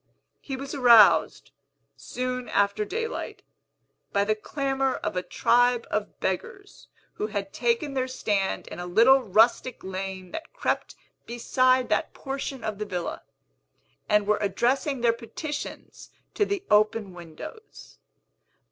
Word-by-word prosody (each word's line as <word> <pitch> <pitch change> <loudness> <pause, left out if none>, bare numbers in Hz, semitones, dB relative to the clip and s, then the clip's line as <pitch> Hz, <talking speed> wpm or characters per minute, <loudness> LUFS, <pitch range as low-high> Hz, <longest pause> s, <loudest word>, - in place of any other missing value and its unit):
He 270 - -6
was 275 +1 -7
aroused, 235 -7 +5 0.4
soon 250 0 -4
after 200 +1 +1
daylight, 455 - -4 0.7
by 200 - +2
the 215 +1 +2
clamor 270 +3 -1
of - - -4
a 180 - 0
tribe 245 +4 +2
of 210 0 -3
beggars 400 - -5 0.3
who 210 - -3
had 200 -2 -4
taken 240 +5 0
their 260 -1 -1
stand 205 -6 -1
in - - -8
a 175 - -5
little 240 +9 +5
rustic 230 +3 +2
lane 190 -1 -6
that 325 - -7
crept - - -2 0.3
beside 255 +2 +2
that - - 0
portion 270 -2 -5
of 215 -2 -4
the 210 - -2
villa, 180 -4 -4 0.9
and 210 -1 +3
were 210 0 +2
addressing 245 +7 0
their 235 -1 +4
petitions 285 +6 -7 0.2
to 415 - +2
the 400 -1 -3
open 210 -1 +3
windows. 175 - -11
235 Hz, 130 wpm, -26 LUFS, 205-270 Hz, 0.9 s, aroused